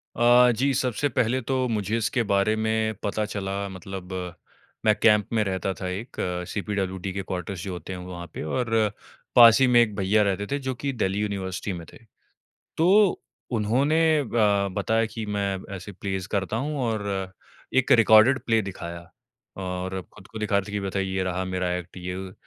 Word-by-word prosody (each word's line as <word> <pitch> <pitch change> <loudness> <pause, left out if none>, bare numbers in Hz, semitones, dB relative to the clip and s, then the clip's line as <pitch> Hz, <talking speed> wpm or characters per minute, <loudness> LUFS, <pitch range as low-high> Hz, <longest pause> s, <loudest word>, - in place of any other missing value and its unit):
अ, 120 +1 +6
जी, 135 +4 +1
सबसे 130 +1 0
पहले 125 +1 +1
तो 130 +1 0
मुझे 110 0 -1
इसके 115 +2 0
बारे 100 +2 +3
में 110 0 0
पता 105 +1 -1
चला, 100 -1 -3
मतलब 95 0 -8 0.7
मैं 110 -1 +5
कैंप 105 -3 +5
में 110 -2 +3
रहता 95 -1 -2
था 95 -1 -6
एक, 100 +7 -6 0.3
सीपीडब्ल्यूडी 95 -2 -3
के 95 - -3
क्वार्टर्स 95 0 -5
जो 95 - -4
होते 90 +2 -7
हैं 90 - -6
वहाँ 90 -1 -7
पे, - - -5
और 115 +2 0 0.4
पास 115 0 +9
ही 130 - +6
में 120 -1 +6
एक 105 -3 +1
भैया 100 +2 +2
रहते 100 0 -1
थे 140 - 0
जो 130 - 0
कि 140 +3 -3
दिल्ली 95 -4 -1
यूनिवर्सिटी 100 -2 -3
में 85 -2 -7
थे। - - -12 0.8
तो 190 +4 +4 0.3
उन्होंने 125 +8 +2 0.3
ब 100 -3 +3
बताया 110 +3 +1
कि, 110 0 -6
"मैं 100 -2 -1 0.2
ऐसे 95 +2 -9
प्लेज़ 95 -1 -4
करता 100 +2 -1
हूँ।" 145 +4 -2
और 100 -5 -2 0.4
एक 130 - +4
रिकॉर्डेड 115 +3 +6
प्ले 115 -1 +3
दिखाया, 85 -2 -7 0.5
और 95 0 -4
खुद 95 - -14
को 110 - -9
दिखा 105 -2 +1
रहे 100 +1 -4
थे - - -7
कि 105 - -1
बथा 100 0 -2
ये 95 0 -1
रहा 95 0 -2
मेरा 90 -1 -2
एक्ट, 90 +1 -8
ये, 90 0 -5
वो। 95 0 -7
100 Hz, 185 wpm, -25 LUFS, 95-115 Hz, 0.8 s, पास